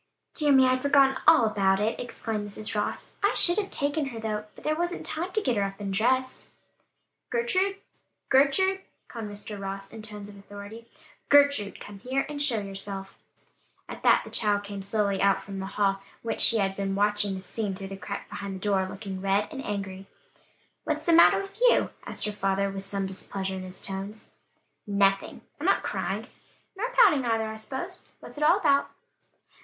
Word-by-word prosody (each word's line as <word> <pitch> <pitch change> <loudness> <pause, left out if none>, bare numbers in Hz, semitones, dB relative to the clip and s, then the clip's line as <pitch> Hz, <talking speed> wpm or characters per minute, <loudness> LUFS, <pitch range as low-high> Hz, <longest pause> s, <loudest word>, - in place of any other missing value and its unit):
"Dear 300 -2 +3
me, 265 -1 +7
I'd 255 0 +2
forgotten 275 -1 +4
all 315 -7 +7
about 195 -3 +2
it!" 215 +2 0
exclaimed 225 -3 -4
Mrs. 215 +1 -2
Ross. 210 - -2
"I 405 - +3
should 350 +4 +6
have 400 -2 -3
taken 285 +1 -1
her 235 -4 -6
though, 215 -1 -3
but - - -14
there 310 - +1
wasn't 345 +2 -3
time 350 +4 -3
to 430 - +1
get 250 - +1
her - - +2
up 195 0 -3
and 200 -1 -3
dressed." 255 +5 +1 0.8
"Gertrude! 400 -5 +1 0.5
Gertrude!" 295 +9 +4 0.3
called 230 -2 -6
Mr. 205 0 -7
Ross, 195 0 -6
in 225 - -8
tones 210 -2 -8
of 205 - -11
authority, 205 +3 -10 0.4
"Gertrude, 280 -8 +4
come 205 -1 -10
here 260 +5 -1
and 290 -1 -5
show 255 -7 +1
yourself." 195 0 -4 0.7
At - - -8
that - - +5
the - - -11
child 205 -2 +1
came 200 -1 -6
slowly 200 0 0
out 195 0 +4
from 195 -1 -7
the 190 - -4
hall 195 -1 +2 0.2
whence 230 - -2
she 230 - +7
had 195 -2 0
been 195 0 -2
watching 205 -1 +1
the 190 - -6
scene 200 +1 -3
through 195 0 -7
the 195 - -6
crack 200 +1 -6
behind 200 -1 -6
the - - -7
door 195 -1 +1
looking 190 -1 -6
red 195 +1 +1
and 270 -3 -6
angry. 195 -2 -5 0.8
"What's - - -2
the 340 - +4
matter 340 - +7
with 390 +3 -9
you?" - - +4 0.2
asked - - -2
her 210 - -1
father, 195 -1 0
with 195 0 -4
some 195 0 -1
displeasure 190 0 -4
in 190 - -5
his 185 0 -7
tones. 195 +3 -6 0.6
"Nothing, 195 -1 +1 0.2
I'm - - -2
not - - +3
crying." - - -2 0.5
"Nor 450 +6 -2
pouting 410 - +5
either, 225 -2 +1
I 220 - -5
suppose? 265 +5 -4
What's - - -10
it - - 0
all 330 +5 +6
about." 285 -6 +3
210 Hz, 190 wpm, -27 LUFS, 195-275 Hz, 0.8 s, me